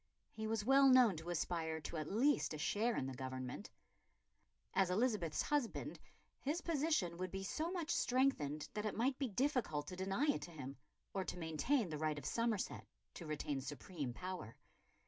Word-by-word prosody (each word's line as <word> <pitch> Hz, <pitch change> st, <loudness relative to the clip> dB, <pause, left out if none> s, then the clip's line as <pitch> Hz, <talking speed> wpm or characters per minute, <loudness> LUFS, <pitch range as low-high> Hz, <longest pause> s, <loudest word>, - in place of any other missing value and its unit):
He 220 Hz, 0 st, -4 dB
was 220 Hz, -1 st, 0 dB
well 270 Hz, +2 st, +7 dB
known 250 Hz, -6 st, +7 dB
to 160 Hz, +2 st, -6 dB
aspire 165 Hz, -1 st, -1 dB
to 165 Hz, -, -5 dB
at 155 Hz, +2 st, -3 dB
least 250 Hz, -, +3 dB
a -, -, -4 dB
share 220 Hz, +9 st, +1 dB
in -, -, 0 dB
the 135 Hz, -, -4 dB
government. 130 Hz, +6 st, -5 dB, 1.0 s
As 190 Hz, -2 st, +3 dB
Elizabeth's 200 Hz, -5 st, +1 dB
husband 290 Hz, -6 st, -1 dB, 0.4 s
his 305 Hz, +5 st, -1 dB
position 295 Hz, -, +1 dB
would 185 Hz, 0 st, -2 dB
be 195 Hz, +2 st, -4 dB
so 315 Hz, -, -1 dB
much 345 Hz, -3 st, -2 dB
strengthened 240 Hz, -, +2 dB
that 210 Hz, 0 st, -1 dB
it 210 Hz, -, -3 dB
might 260 Hz, +4 st, +1 dB
be 270 Hz, -3 st, 0 dB
difficult 240 Hz, -, +1 dB
to 185 Hz, -, -5 dB
deny 195 Hz, +8 st, 0 dB
it 290 Hz, -, +2 dB
to 175 Hz, -, -7 dB
him, 135 Hz, -4 st, -6 dB, 0.4 s
or 195 Hz, -, 0 dB
to 180 Hz, -, -4 dB
maintain 175 Hz, -, +1 dB
the 150 Hz, -1 st, -3 dB
right 155 Hz, -1 st, 0 dB
of 145 Hz, -, -6 dB
Somerset 230 Hz, -, -1 dB, 0.3 s
to 175 Hz, -9 st, -8 dB
retain 150 Hz, -2 st, -2 dB
supreme 145 Hz, 0 st, -4 dB
power. 180 Hz, -6 st, -6 dB
190 Hz, 180 wpm, -39 LUFS, 155-255 Hz, 1.0 s, well